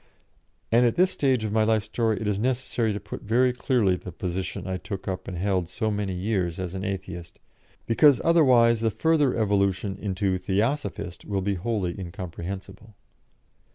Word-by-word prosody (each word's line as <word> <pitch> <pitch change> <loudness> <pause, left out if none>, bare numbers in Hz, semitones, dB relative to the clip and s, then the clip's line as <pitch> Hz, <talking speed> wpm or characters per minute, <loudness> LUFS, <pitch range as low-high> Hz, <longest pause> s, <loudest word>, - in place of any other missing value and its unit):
And 120 +2 +5
at 120 - +2
this 185 +1 +3
stage 130 -5 +1
of 110 - -2
my 110 0 +3
life 110 -1 +2
story, 110 0 -1
it 110 - -4
is 100 -1 0
necessary 120 -2 0
to 100 - -3
put 100 +1 -8
very 125 +4 +2
clearly 120 -7 +2
the 90 0 -8
position 90 +2 -4
I 95 0 -2
took 95 +1 -7
up 95 -1 -4
and 90 - -5
held 90 -2 0
so 110 0 -2
many 100 -2 -2
years 90 -3 -1
as 90 -2 -4
Atheist, 95 -3 -5 0.5
because 140 +4 +5
otherwise 125 -9 +5
the 115 - +2
further 150 +1 +2
evolution 100 -2 0
into 95 -2 -1
Theosophist 100 -1 -2
will 100 -2 -2
be 100 +1 0
wholly 95 -2 -2
incomprehensible. 95 +4 -7
100 Hz, 165 wpm, -26 LUFS, 95-115 Hz, 0.5 s, And